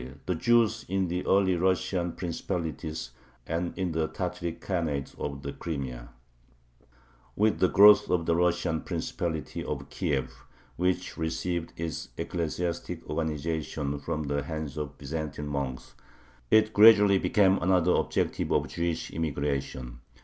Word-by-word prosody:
THE 90 - 0
JEWS 115 +4 +3
IN 95 -1 0
THE 90 +1 -2
EARLY 95 -1 +4
RUSSIAN 90 -1 0
PRINCIPALITIES 80 -6 -4 0.3
AND 85 +2 -3
IN 95 -2 -1
THE 80 -1 0
TATARIC 85 +1 -4
KHANATE 80 -7 -2
OF 70 -1 -4
THE 70 - -4
CRIMEA 70 -6 -5 1.3
With 110 +1 +2
the 90 - +5
growth 105 +3 +7
of 90 -2 +1
the 85 - +2
Russian 85 -2 +1
Principality 80 -4 -3
of - - -5
Kiev, 65 -3 -1 0.4
which 90 0 -1
received 80 +1 -2
its 80 -3 -4
ecclesiastic 85 +1 -3
organization 75 -2 -2
from 75 +2 -3
the 70 0 -1
hands 75 -1 -5
of 75 -1 -5
Byzantine 75 0 -4
monks, 70 -3 -4 0.6
it 110 +4 +4
gradually 105 -2 +7
became 95 -1 +3
another 90 0 +3
objective - - 0
of - - +1
Jewish 85 -1 -2
immigration. 70 -5 -3
80 Hz, 130 wpm, -28 LUFS, 75-90 Hz, 1.3 s, growth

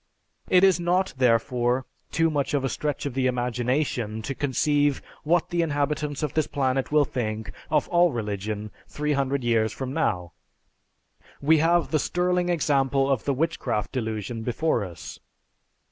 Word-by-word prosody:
It 185 0 +5
is 190 -3 +5
not, 180 +2 +1
therefore, 125 +1 +2 0.2
too 165 -1 +1
much 145 -1 0
of 135 -2 0
a - - 0
stretch 145 +1 -3
of 140 - -3
the 130 0 +1
imagination 125 -2 -1
to 135 - -3
conceive 145 +1 +1 0.2
what 170 +2 +2
the 175 0 +1
inhabitants 150 -1 -1
of 150 - -2
this 155 -2 +1
planet 135 -1 -1
will 150 -1 +4
think 110 -4 -3 0.2
of 150 -2 +2
all 175 -1 +4
religion 105 -2 -4 0.2
300 140 -3 -1
years 115 -2 +2
from 130 -1 -5
now. 90 - -1 1.1
We 155 +2 +4
have 170 +2 +2
the 155 - +2
sterling 180 +2 0
example 140 -4 +2
of 130 -5 0
the 140 - +1
Witchcraft 155 -8 -1
Delusion 110 -2 -3
before 120 +1 0
us. 90 -4 -9
140 Hz, 150 wpm, -25 LUFS, 120-155 Hz, 1.1 s, It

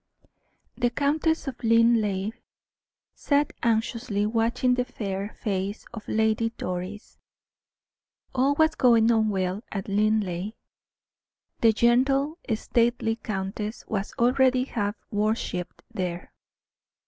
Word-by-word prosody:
The 245 -1 +1
Countess 295 +4 0
of 255 -3 -6
Linleigh 225 -3 +3 0.8
sat 290 0 +1
anxiously 225 -2 0
watching 230 +3 +1
the 250 0 +1
fair 205 -4 -5
face 200 0 -2
of 215 -3 -8
Lady 220 +1 +1
Doris. 185 +4 -5 1.1
All 270 +2 +2
was 315 +1 +3
going 235 -5 +4
on 220 -1 +3
well 190 +1 -1
at 195 -2 -4
Linleigh. 205 -2 0 1.1
The 230 - +5
gentle, 270 - +2 0.2
stately 230 0 +1
countess 210 +1 -4
was 205 -2 -3
already 255 +1 +3
half 210 -5 -2 0.2
worshiped 205 -4 -2
there. 180 -2 -4
225 Hz, 100 wpm, -26 LUFS, 205-250 Hz, 1.1 s, The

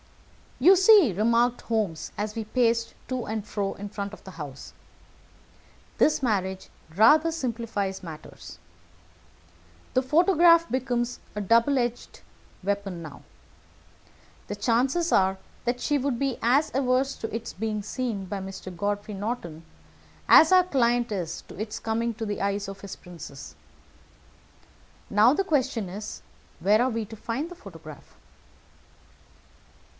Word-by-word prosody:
"You 355 +9 +7
see," 380 - +6
remarked 235 +4 +2
Holmes, 210 -8 -2
as 210 +1 -3
we 225 - -3
paced 230 0 +1
to 255 -2 -3
and 215 -1 -4
fro 200 -2 -2
in 205 +1 -7
front 200 0 -5
of - - -12
the 190 - -10
house, 145 -6 -9 1.3
"this 305 - +3
marriage 190 -5 -1 0.3
rather 305 - +6
simplifies 230 -9 -3
matters. 160 -4 -10 1.4
The 255 - +4
photograph 335 +3 +5
becomes 245 -1 -1 0.2
a 210 - -2
double 230 +7 +3
edged 240 0 -4 0.4
weapon 200 -3 -2
now. 150 -3 -10 1.3
The 205 - -4
chances 260 +10 +1
are 190 0 +3 0.3
that 245 +1 0
she 295 - +1
would 265 -2 -1
be 270 -3 -1
as 270 +6 +3
averse 265 +1 +1
to 225 - -5
its 230 - -5
being 215 +1 -3
seen 220 -3 -3
by 200 +1 -4
Mr. 190 -1 -8
Godfrey 205 +3 -2
Norton 195 -6 -5 0.6
as 320 - +8
our 370 -1 +7
client 240 -7 +1
is 180 -5 -3
to - - -11
its 215 0 -4
coming 230 +1 -1
to 225 0 -4
the 205 -1 -3
eyes 200 0 -1
of 195 0 -8
his 200 -1 -7
princess. 140 - -11 1.6
Now 215 +5 +5
the 390 - +1
question 260 - 0
is 205 +3 -7 0.4
where 205 +6 +3
are 255 - +2
we 225 -2 -2
to 220 - -10
find 240 +9 -4
the 355 - -10
photograph?" 165 - -13
225 Hz, 140 wpm, -26 LUFS, 200-255 Hz, 1.6 s, as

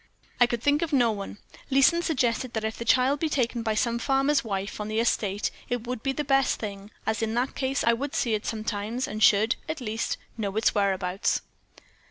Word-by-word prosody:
"I 245 - +6
could 235 -1 -3
think 290 +1 +3
of 335 -2 -1
no 245 -5 +4
one. 200 -1 -6 0.3
Leeson 275 +6 +4
suggested 255 -7 0
that 220 - -2
if 220 0 -2
the 235 - -6
child 255 +4 +3
be 320 - 0
taken 245 -4 0
by 220 -1 -1
some 235 +2 +1
farmer's 275 +3 +2
wife 200 -1 -4
on 210 - -4
the 215 +1 -1
estate, 205 -3 0 0.2
it 245 -1 -2
would 250 -1 -4
be 270 - 0
the 295 +2 -2
best 270 -1 +2
thing, 200 -1 -6 0.2
as 220 0 -1
in 225 0 -1
that 250 +3 0
case 270 +1 -1
I 235 - +4
would 275 +4 -3
see 235 - +1
it 210 0 -2
sometimes, 220 +2 -2
and 215 - -5
should, 215 +2 +5
at 315 0 -3
least, 225 -2 -2 0.2
know 200 -2 -2
its 220 - +3
whereabouts. 195 -2 0
235 Hz, 215 wpm, -26 LUFS, 215-265 Hz, 0.3 s, I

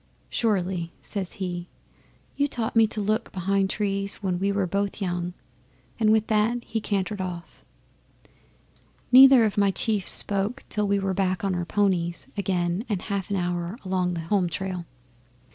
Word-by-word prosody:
'"Surely," 185 -7 0
says 195 -4 -4
he. 180 -3 -4 0.7
"You 285 - +2
taught 235 -5 -3
me 225 -1 +6
to 215 - -4
look 215 +3 -1
behind 195 +1 0
trees 200 -1 -1
when 185 -3 -2
we 200 +1 +1
were 200 -1 0
both 200 +3 -2
young." 175 -2 -3 0.6
And 215 -1 +4
with 220 0 +3
that 225 +3 +1
he 225 - -3
cantered 200 -1 -2
off. 175 -2 -7 1.5
'Neither 260 -2 +9
of 210 -1 0
my 200 -1 +4
chiefs 205 0 +1
spoke 205 +6 +1
till 210 -1 +1
we 200 0 +2
were 195 -1 -1
back 185 -1 0
on 195 -1 0
our 175 -1 -2
ponies 180 -3 0
again 185 -1 -1
and 200 -4 -1
a 205 - -5
half 195 -1 -3
hour 175 +1 -2
along 180 -1 0
the 165 - -3
home 180 +1 +1
trail. 180 0 -4
195 Hz, 160 wpm, -25 LUFS, 180-210 Hz, 1.5 s, Neither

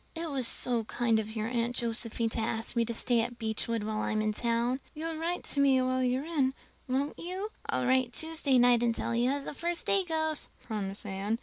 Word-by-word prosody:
It 330 -1 -3
was 260 -4 +1
so 240 -1 +1
kind 230 -1 +1
of 220 +1 -5
your 215 0 -1
Aunt 240 0 -1
Josephine 230 -1 -1
to 225 - -2
ask 225 +1 -1
me 235 - +3
to 235 - -3
stay 235 0 +2
at 240 +1 -4
Beechwood 225 0 -1
while 215 0 -2
I'm 215 0 0
in 215 0 +1
town." 235 +3 +1 0.2
"You'll 325 +1 -3
write 340 +2 -2
to 285 - +1
me 275 -2 +5
while 255 0 +1
you're 255 +3 +1
in, 280 -5 +1 0.3
won't 270 +3 -1
you?" 370 +4 -3 0.2
"I'll - - 0
write 255 -1 +3
Tuesday 315 -4 +1
night 245 -1 +5
and 235 -1 +2
tell - - -2
you 240 +2 +2
how 280 - +1
the 280 - -5
first 340 +3 -2
day 395 -1 +3
goes," 315 -3 -1 0.2
promised 205 -3 -4
Anne. 200 +3 -1
245 Hz, 220 wpm, -30 LUFS, 225-285 Hz, 0.3 s, me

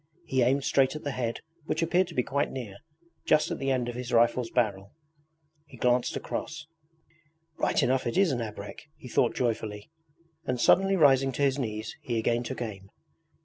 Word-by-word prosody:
He 130 -5 +1
aimed 135 +3 +2
straight 135 +1 +2
at 155 - -7
the 145 - -2
head 120 -3 -3 0.2
which 160 +1 -1
appeared 180 +2 +2
to - - -10
be 125 - +2
quite 140 +3 -1
near 110 -7 -7 0.5
just 155 0 +3
at - - -3
the 135 - -1
end 130 -2 0
of 120 - -3
his 125 +1 -6
rifle's 120 0 +3
barrel. 100 -5 -1 0.7
He 130 - -14
glanced 125 +1 +1
cross. 155 -2 -5 0.9
'Right - - +2
enough 130 0 +1
it 120 - -2
is 195 -4 +4
an 120 -3 -1
abrek! 105 +6 -8
he - - -11
thought 120 -1 +1
joyfully, 110 -2 -2 0.5
and 125 -6 -2
suddenly 195 +8 +4
rising 135 -5 +5
to 140 - -1
his 135 0 +2
knees 110 -3 -4
he 120 -2 -2
again 115 +1 +1
took 125 0 -4
aim. 100 -4 -8
125 Hz, 190 wpm, -28 LUFS, 115-140 Hz, 0.9 s, rising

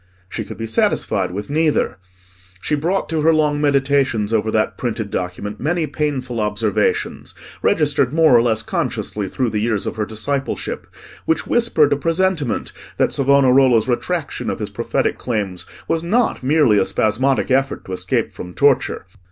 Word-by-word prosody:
She 95 - -5
could - - -9
be 115 - -4
satisfied 115 0 0
with 100 +3 -5
neither. 155 -7 0 0.6
She 120 - -3
brought 170 +7 0
to 160 -1 0
her 160 +2 +4
long 150 -2 +1
meditations 135 -6 +1
over 110 0 +1
that 110 0 0
printed 110 -4 -3
document 95 +3 -4
many 160 +4 0
painful 140 -5 -3
observations, 105 -1 -1 0.3
registered 145 -4 +2
more 155 -4 +5
or 115 - +6
less 110 -2 +1
consciously 105 -2 -3
through 125 +1 -1
the 105 - -1
years 110 -3 0
of - - -4
her 105 - 0
discipleship, 135 +6 -3 0.4
which 160 -1 0
whispered 230 -12 +2
a - - 0
presentiment 165 -3 0 0.3
that - - +2
Savonarola's 135 -4 +4
retraction 120 -2 -2
of - - -2
his - - -5
prophetic - - -1
claims 100 -7 -3 0.2
was 165 - 0
not 220 +8 +1
merely 130 -6 +3
a 95 - +2
spasmodic 130 +6 +1
effort 135 +1 0
to - - -9
escape 90 - -1
from 90 0 -9
torture. 140 -9 +2
130 Hz, 160 wpm, -19 LUFS, 110-150 Hz, 0.6 s, or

